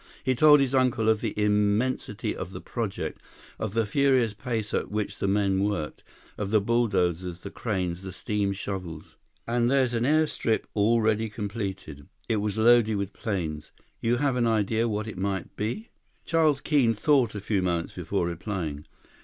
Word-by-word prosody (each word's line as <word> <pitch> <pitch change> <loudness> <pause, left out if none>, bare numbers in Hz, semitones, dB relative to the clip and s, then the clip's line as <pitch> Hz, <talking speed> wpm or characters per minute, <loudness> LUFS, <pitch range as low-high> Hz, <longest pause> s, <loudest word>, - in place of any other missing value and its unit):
He 130 - +2
told 150 +3 +7
his 135 -1 0
uncle 125 -4 +2
of 110 -1 +2
the - - -3
immensity 105 +4 +1
of - - -5
the - - -6
project, - - -4 0.4
of 110 -1 -3
the 115 -1 +2
furious 130 -1 +2
pace 110 0 -3
at - - -1
which 105 -1 -3
the - - 0
men 100 -1 +2
worked, 90 -8 -2 0.4
of 100 -2 -2
the 110 +1 +4
bulldozers, 95 -6 0
the - - -7
cranes, 95 -6 -2
the 95 -1 -7
steam 100 +1 -1
shovels. 95 -5 -6 0.3
"And 120 0 +1
there's 130 -2 +2
an 115 0 0
air 155 +2 +4
strip 115 -6 -1
already 110 +1 +2
completed. 100 -9 -5 0.2
It 110 - +1
was 105 0 -2
loaded 115 -1 +5
with 100 0 -3
planes. 80 -8 -4 0.3
You 120 +1 +1
have 135 -1 +1
an 120 -1 +2
idea 110 +1 +1
what 105 -1 -2
it 110 - -7
might 95 -1 -3
be?" 115 - -3 0.4
Charles 155 -4 +2
Keene 130 -7 +3
thought 125 -1 +2
a - - -3
few 100 -1 0
moments 85 -2 -1
before 90 +1 -2
replying. 85 -4 -4
105 Hz, 170 wpm, -27 LUFS, 95-120 Hz, 0.4 s, told